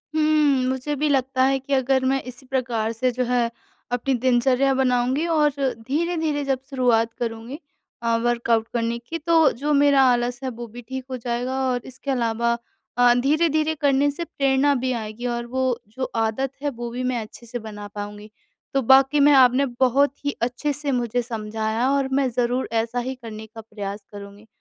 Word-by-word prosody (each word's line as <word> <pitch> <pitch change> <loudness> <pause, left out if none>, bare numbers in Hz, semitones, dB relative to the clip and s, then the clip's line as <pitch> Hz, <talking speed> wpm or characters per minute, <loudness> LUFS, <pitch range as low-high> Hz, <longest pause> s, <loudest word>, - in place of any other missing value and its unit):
हुँ। 305 -4 +3
मुझे 265 +3 -2
भी 295 +1 0
लगता 260 -1 +1
है 270 0 +2
कि 275 +2 -4
अगर 265 0 +2
मैं 270 +1 +1
इसी 250 +1 -10
प्रकार 240 -4 -1
से 250 +2 0
जो 250 +1 -1
है 240 -1 +1 0.4
अपनी 245 +2 0
दिनचर्या 255 +2 +2
बनाऊँगी 260 +3 +1
और 305 -3 +3 0.4
धीरे-धीरे 315 0 0
जब 270 -2 0
शुरुआत 235 -4 +2
करूँगी 230 +5 -4 0.4
अ, 230 0 +2
वर्कआउट 235 -2 +1
करने 235 0 -1
की 320 +8 -6
तो 325 -1 +4
जो 300 0 +1
मेरा 280 -1 +5
आलस 245 0 0
है 260 - -1
वो 240 0 -7
भी 240 +2 -10
ठीक 260 +2 -7
हो 255 - -2
जाएगा 245 +2 -2
और 245 -1 -1
इसके 260 +2 -6
अलावा 235 -1 +1 0.4
अ, 245 0 +6
धीरे-धीरे 310 +4 +2
करने 285 0 +3
से 340 +4 -5
प्रेरणा 275 -1 +2
भी 255 0 -1
आएगी 225 0 -5
और 235 - -4
वो 260 -1 -1
जो 240 +5 -6
आदत 225 +4 0
है 290 - 0
वो 240 -3 -6
भी 250 +2 -4
मैं 250 -2 -1
अच्छे 220 +2 -11
से 240 +1 -5
बना 210 -2 -8
पाऊँगी। 205 +1 -8 0.4
तो 275 - +2
बाकी 270 +3 +5
मैं 290 +1 +6
आपने 260 0 +5
बहुत 265 +2 +3
ही 285 - +1
अच्छे 250 +5 -1
से 290 0 -2
मुझे 245 -1 0
समझाया 220 +1 -2
और 275 -1 +1
मैं 270 -1 +2
ज़रूर 245 +2 0
ऐसा 230 +2 0
ही 260 +2 -3
करने 220 -3 -9
का 225 0 -11
प्रयास 205 -2 -7
करूँगी, 205 +1 -11
255 Hz, 185 wpm, -23 LUFS, 235-275 Hz, 0.4 s, अ